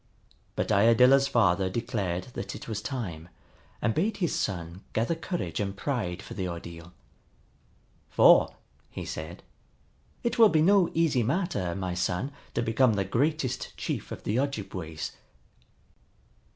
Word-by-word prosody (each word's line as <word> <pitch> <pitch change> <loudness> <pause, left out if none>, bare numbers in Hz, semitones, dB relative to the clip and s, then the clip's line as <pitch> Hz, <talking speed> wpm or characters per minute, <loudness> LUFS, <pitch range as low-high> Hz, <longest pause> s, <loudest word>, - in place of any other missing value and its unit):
But - - -1
Iadilla's 125 +6 +5
father 95 -6 +2
declared 100 -4 -3
that - - -5
it - - -9
was 110 -3 -3
time, 90 - -5 0.5
and 115 - +2
bade 205 - 0
his 175 -4 0
son 85 -1 -3
gather 115 +8 +1
courage 165 - -4
and 100 -1 -3
pride 105 -10 -2
for - - -9
the 95 -3 -3
ordeal. 85 -1 -8 1.2
"For," - - +6 0.3
he - - -7
said, 80 +2 -7 0.8
"it 235 0 -1
will 225 -2 +9
be 155 -3 +3
no 195 0 +5
easy 160 -6 +3
matter, 120 - -1
my 95 -2 -3
son, 90 +9 -1 0.2
to 120 - +1
become 115 +1 +3
the 100 -1 0
greatest 130 +4 -1
chief - - -4
of - - -7
the 110 +4 0
Ojibways." 95 - -4
110 Hz, 140 wpm, -28 LUFS, 90-140 Hz, 1.2 s, will